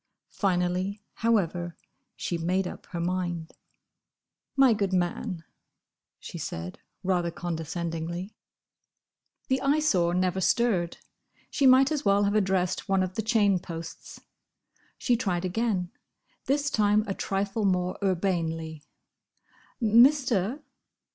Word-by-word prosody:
Finally, 185 Hz, +1 st, -1 dB
however, 175 Hz, -7 st, 0 dB, 0.4 s
she 175 Hz, -, -3 dB
made 180 Hz, +3 st, 0 dB
up -, -, -9 dB
her 175 Hz, -, -5 dB
mind. 175 Hz, -2 st, -2 dB, 1.0 s
"My 270 Hz, -3 st, +6 dB
good 200 Hz, -3 st, -1 dB
man," 180 Hz, 0 st, -1 dB, 0.8 s
she -, -, -8 dB
said, 85 Hz, +2 st, -5 dB, 0.2 s
rather 180 Hz, -2 st, +1 dB
condescendingly. 170 Hz, +2 st, -4 dB, 1.1 s
The 260 Hz, 0 st, +1 dB
Eyesore 275 Hz, -, +2 dB
never 185 Hz, +1 st, +1 dB
stirred. 185 Hz, -2 st, +1 dB, 0.5 s
She 275 Hz, -, +3 dB
might 260 Hz, +3 st, +6 dB
as 300 Hz, -3 st, -1 dB
well 200 Hz, 0 st, +3 dB
have 200 Hz, 0 st, +1 dB
addressed 190 Hz, -2 st, 0 dB
one 195 Hz, -1 st, +3 dB
of 185 Hz, 0 st, -3 dB
the 220 Hz, -, -1 dB
chain 210 Hz, -4 st, +3 dB
posts. 165 Hz, -2 st, -8 dB, 0.8 s
She 245 Hz, -, +2 dB
tried 185 Hz, -7 st, -1 dB
again: 185 Hz, -2 st, -1 dB, 0.5 s
this 280 Hz, +1 st, +1 dB
time 210 Hz, -2 st, +3 dB
a 200 Hz, -, -2 dB
trifle 200 Hz, +3 st, -2 dB
more 180 Hz, -2 st, 0 dB
urbanely. 165 Hz, -5 st, -1 dB, 1.0 s
"Mister! 245 Hz, +1 st, +4 dB
190 Hz, 110 wpm, -27 LUFS, 175-220 Hz, 1.1 s, My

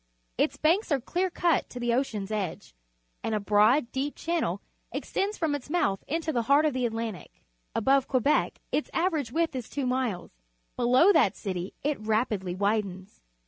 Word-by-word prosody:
Its -, -, 0 dB
banks 345 Hz, +5 st, +2 dB
are 280 Hz, -, +3 dB
clear 355 Hz, +9 st, -1 dB
cut 340 Hz, -4 st, +1 dB
to 250 Hz, -, -7 dB
the 240 Hz, -1 st, 0 dB
ocean's 220 Hz, -6 st, -1 dB
edge, 195 Hz, -, -4 dB, 0.5 s
and 220 Hz, -, -1 dB
a -, -, +1 dB
broad, 215 Hz, +6 st, +3 dB
deep 275 Hz, +2 st, -2 dB
channel 325 Hz, -, -1 dB, 0.3 s
extends 405 Hz, +2 st, -2 dB
from 320 Hz, -3 st, 0 dB
its 285 Hz, -1 st, -5 dB
mouth 200 Hz, -, 0 dB
into 320 Hz, +1 st, -1 dB
the 240 Hz, -, +1 dB
heart 280 Hz, +6 st, +4 dB
of 300 Hz, -, +2 dB
the 250 Hz, -1 st, +1 dB
Atlantic. 225 Hz, -6 st, -6 dB, 0.3 s
Above 270 Hz, +3 st, +3 dB
Quebec 270 Hz, +3 st, +2 dB
its 300 Hz, -, -1 dB
average 320 Hz, -8 st, 0 dB
width 325 Hz, 0 st, 0 dB
is 250 Hz, -3 st, -5 dB
two 280 Hz, -2 st, -3 dB
miles; 250 Hz, -7 st, -1 dB, 0.4 s
below 255 Hz, +11 st, +5 dB
that 210 Hz, -, +4 dB
city 185 Hz, -2 st, -4 dB
it 295 Hz, 0 st, 0 dB
rapidly 215 Hz, -4 st, -1 dB
widens. 200 Hz, -, -2 dB
250 Hz, 170 wpm, -28 LUFS, 210-300 Hz, 0.5 s, below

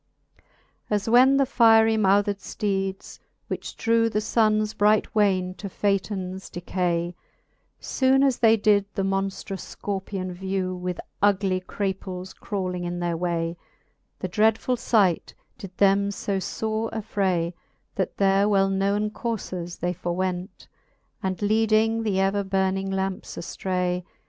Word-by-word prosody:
As 205 Hz, -1 st, 0 dB
when 255 Hz, +4 st, +6 dB
the 275 Hz, -, +4 dB
firie 225 Hz, -3 st, +5 dB
mouthed 205 Hz, -1 st, +2 dB
fteeds, 195 Hz, -1 st, -3 dB, 0.3 s
which -, -, -5 dB
drew 230 Hz, 0 st, +2 dB
The 210 Hz, -, 0 dB
Sunnes 215 Hz, -1 st, +1 dB
bright 210 Hz, 0 st, +3 dB
wayne 190 Hz, -4 st, +2 dB
to 200 Hz, -, -5 dB
Phaetons 190 Hz, -1 st, -2 dB
decay, 175 Hz, -1 st, -2 dB, 0.7 s
Soone 265 Hz, +1 st, +2 dB
as 265 Hz, -3 st, +1 dB
they 225 Hz, -1 st, +5 dB
did 205 Hz, -1 st, +3 dB
the 195 Hz, -, 0 dB
monftrous 195 Hz, 0 st, -2 dB
Scorpion 190 Hz, -2 st, -5 dB
vew, 190 Hz, 0 st, -2 dB
With 180 Hz, -1 st, -4 dB, 0.2 s
ugly 195 Hz, -2 st, +2 dB
craples 190 Hz, -1 st, -4 dB
crawling 185 Hz, -4 st, -4 dB
in 175 Hz, 0 st, -3 dB
their 175 Hz, -1 st, -1 dB
way, 170 Hz, 0 st, -2 dB, 0.6 s
The 185 Hz, -, -4 dB
dreadfull 220 Hz, +6 st, +2 dB
fight 210 Hz, -8 st, +1 dB, 0.2 s
did 190 Hz, -2 st, -10 dB
them 200 Hz, 0 st, +4 dB
fb 195 Hz, -1 st, -3 dB, 0.4 s
ibre -, -, -6 dB
affray, 190 Hz, -5 st, -1 dB, 0.4 s
That 190 Hz, -, -2 dB
their 195 Hz, +1 st, +3 dB
well 195 Hz, -1 st, +3 dB
knowen 200 Hz, +2 st, 0 dB
courfes 185 Hz, -7 st, -5 dB
they 180 Hz, 0 st, 0 dB
forwent. 180 Hz, +2 st, -3 dB, 0.5 s
And 190 Hz, -1 st, -2 dB
leading 220 Hz, +1 st, +2 dB
th'ever 195 Hz, -1 st, +1 dB
burning 190 Hz, 0 st, 0 dB
lampe 190 Hz, 0 st, -2 dB
aftray. 180 Hz, 0 st, -2 dB
195 Hz, 125 wpm, -25 LUFS, 185-215 Hz, 0.7 s, when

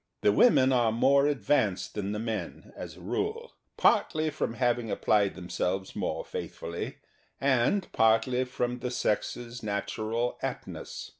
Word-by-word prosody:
The 105 Hz, -, +5 dB
women 130 Hz, -, +5 dB
are 120 Hz, -3 st, +3 dB
more 140 Hz, +5 st, +4 dB
advanced 105 Hz, -9 st, +1 dB
than 100 Hz, -1 st, -3 dB
the 105 Hz, -, -2 dB
men, 110 Hz, -5 st, -5 dB
as 85 Hz, -2 st, -8 dB
a -, -, -13 dB
rule, 435 Hz, -, -3 dB, 0.2 s
partly 155 Hz, -2 st, +3 dB
from 115 Hz, -, -2 dB
having 120 Hz, -2 st, +1 dB
applied 100 Hz, -1 st, +2 dB
them 90 Hz, -2 st, -8 dB
selves 95 Hz, +2 st, -2 dB
more -, -, -2 dB
faithfully 85 Hz, +1 st, -5 dB, 0.4 s
and 140 Hz, +8 st, +2 dB
partly 115 Hz, +3 st, +3 dB
from 125 Hz, -1 st, -2 dB
the 125 Hz, +1 st, -3 dB
sex's 120 Hz, +1 st, -2 dB
natural 110 Hz, +3 st, -2 dB
aptness. -, -, -6 dB
115 Hz, 140 wpm, -29 LUFS, 105-130 Hz, 0.4 s, The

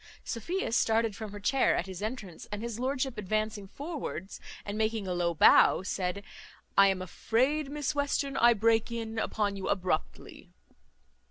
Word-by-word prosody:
Sophia 340 Hz, -, -3 dB
started 225 Hz, -2 st, +2 dB
from 215 Hz, -1 st, -7 dB
her 205 Hz, -, -8 dB
chair 260 Hz, +7 st, +2 dB
at -, -, -1 dB
his 190 Hz, -1 st, -8 dB
entrance; 215 Hz, -5 st, -6 dB
and 210 Hz, +1 st, -4 dB
his 235 Hz, -1 st, -4 dB
lordship 260 Hz, -2 st, -1 dB
advancing 215 Hz, 0 st, -2 dB
forwards, 275 Hz, -, -6 dB, 0.3 s
and 205 Hz, -, -4 dB
making 220 Hz, -1 st, 0 dB
a 180 Hz, -, -1 dB
low 175 Hz, -1 st, 0 dB
bow, 170 Hz, -, +6 dB
said, 185 Hz, +1 st, -2 dB, 0.5 s
"I 195 Hz, 0 st, +7 dB
am 190 Hz, -1 st, 0 dB
afraid, 265 Hz, -, 0 dB
Miss 295 Hz, 0 st, -2 dB
Western, 285 Hz, -1 st, -1 dB
I 235 Hz, 0 st, +5 dB
break 225 Hz, +2 st, +2 dB
in 225 Hz, -1 st, -4 dB
upon 205 Hz, -2 st, -1 dB
you 195 Hz, -, -4 dB
abruptly." 180 Hz, -3 st, -3 dB
220 Hz, 160 wpm, -30 LUFS, 195-255 Hz, 0.5 s, I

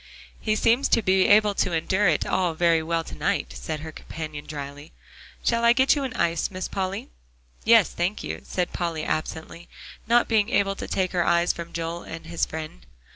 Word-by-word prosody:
"He 215 Hz, -1 st, 0 dB
seems 235 Hz, +5 st, +3 dB
to 230 Hz, -, +2 dB
be 190 Hz, 0 st, +3 dB
able 210 Hz, 0 st, +5 dB
to 185 Hz, -2 st, 0 dB
endure 190 Hz, +5 st, +1 dB
it 155 Hz, -4 st, +2 dB
all 180 Hz, -3 st, 0 dB
very 165 Hz, -1 st, +3 dB
well 165 Hz, +1 st, -1 dB
to -, -, -10 dB
night," -, -, -1 dB
said 155 Hz, -2 st, -5 dB
her 160 Hz, 0 st, -7 dB
companion 155 Hz, -1 st, -7 dB
dryly. 145 Hz, 0 st, -8 dB, 0.5 s
"Shall 235 Hz, 0 st, +1 dB
I 235 Hz, 0 st, +6 dB
get 265 Hz, +3 st, +4 dB
you 285 Hz, -, -2 dB
an 255 Hz, -2 st, -4 dB
ice, 170 Hz, -1 st, 0 dB
Miss 185 Hz, -1 st, -4 dB
Polly?" 190 Hz, -, -3 dB, 0.6 s
"Yes, 225 Hz, -3 st, +6 dB
thank 180 Hz, +5 st, -2 dB
you," -, -, -5 dB
said 180 Hz, -1 st, -2 dB
Polly 165 Hz, -3 st, -2 dB
absently, 160 Hz, +2 st, -4 dB, 0.4 s
not 235 Hz, +1 st, +4 dB
being 220 Hz, -1 st, +2 dB
able 200 Hz, -5 st, +2 dB
to -, -, -5 dB
take 185 Hz, -1 st, -1 dB
her 175 Hz, -2 st, +1 dB
eyes 170 Hz, +1 st, +2 dB
from 170 Hz, 0 st, -8 dB
Joel 170 Hz, +1 st, -4 dB
and 165 Hz, 0 st, -9 dB
his 170 Hz, 0 st, -1 dB
friend. 155 Hz, -, -7 dB
175 Hz, 195 wpm, -25 LUFS, 160-205 Hz, 0.6 s, I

